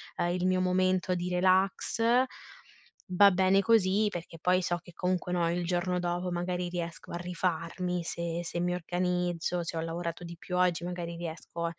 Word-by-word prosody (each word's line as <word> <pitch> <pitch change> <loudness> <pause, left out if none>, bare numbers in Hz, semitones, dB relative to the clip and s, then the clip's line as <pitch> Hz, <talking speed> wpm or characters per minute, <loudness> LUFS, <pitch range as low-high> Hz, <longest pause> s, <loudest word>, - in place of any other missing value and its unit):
ehm, 175 - 0
il 180 0 -1
mio 185 0 +2
momento 185 0 +2
di 175 0 -2
relax; 185 +4 +2 1.1
va 200 +2 +6
bene 190 +1 +4
così, 205 0 +3
perché 170 -2 -7
poi 180 +2 +3
so 175 -1 0
che 175 - -15
comunque 180 0 -1
no, 170 -1 +1
il 175 0 -1
giorno 180 +1 0
dopo 175 +1 -2
magari 175 0 -2
riesco 170 -1 -5
a 170 - -3
rifarmi, 175 0 -2
se 170 0 -3
se 170 +1 -3
mi 180 0 0
organizzo, 180 0 -1
se 165 - -4
ho 160 - -1
lavorato 170 +1 -4
di 170 0 -8
più 180 +2 -5
oggi 180 -1 +2
magari 175 -1 -4
riesco 170 0 -5
180 Hz, 175 wpm, -30 LUFS, 170-185 Hz, 1.1 s, va